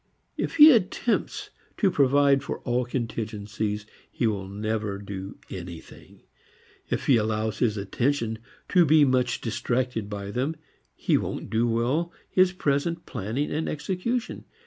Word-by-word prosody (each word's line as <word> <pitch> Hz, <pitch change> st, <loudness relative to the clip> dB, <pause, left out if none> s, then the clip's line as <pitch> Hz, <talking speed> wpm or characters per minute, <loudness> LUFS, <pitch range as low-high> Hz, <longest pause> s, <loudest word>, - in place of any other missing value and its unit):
If -, -, -3 dB
he 310 Hz, 0 st, +10 dB
attempts 225 Hz, 0 st, 0 dB, 0.3 s
to 195 Hz, -4 st, +3 dB
provide 140 Hz, -1 st, +4 dB
for 140 Hz, -, -4 dB
all 125 Hz, 0 st, 0 dB
contingencies, 110 Hz, -3 st, -3 dB, 0.3 s
he -, -, -1 dB
will 100 Hz, -4 st, -1 dB
never 105 Hz, 0 st, -2 dB
do 100 Hz, -1 st, -7 dB
anything; 85 Hz, -3 st, -10 dB, 0.7 s
if -, -, -2 dB
he 130 Hz, -, +5 dB
allows 110 Hz, 0 st, -1 dB
his 110 Hz, -3 st, +1 dB
attention 115 Hz, +3 st, -1 dB, 0.3 s
to 180 Hz, -2 st, +5 dB
be 155 Hz, -1 st, +6 dB
much 130 Hz, -2 st, +1 dB
distracted 120 Hz, -1 st, -1 dB
by 100 Hz, -1 st, -5 dB
them, 130 Hz, +8 st, -1 dB, 0.4 s
he -, -, +2 dB
won't -, -, -5 dB
do 115 Hz, +2 st, +2 dB
well 125 Hz, +9 st, 0 dB, 0.2 s
his 185 Hz, -1 st, +4 dB
present 165 Hz, 0 st, -1 dB
planning 120 Hz, +5 st, -3 dB
and 155 Hz, +2 st, -1 dB
execution. 190 Hz, -, -3 dB
120 Hz, 135 wpm, -26 LUFS, 105-145 Hz, 0.7 s, he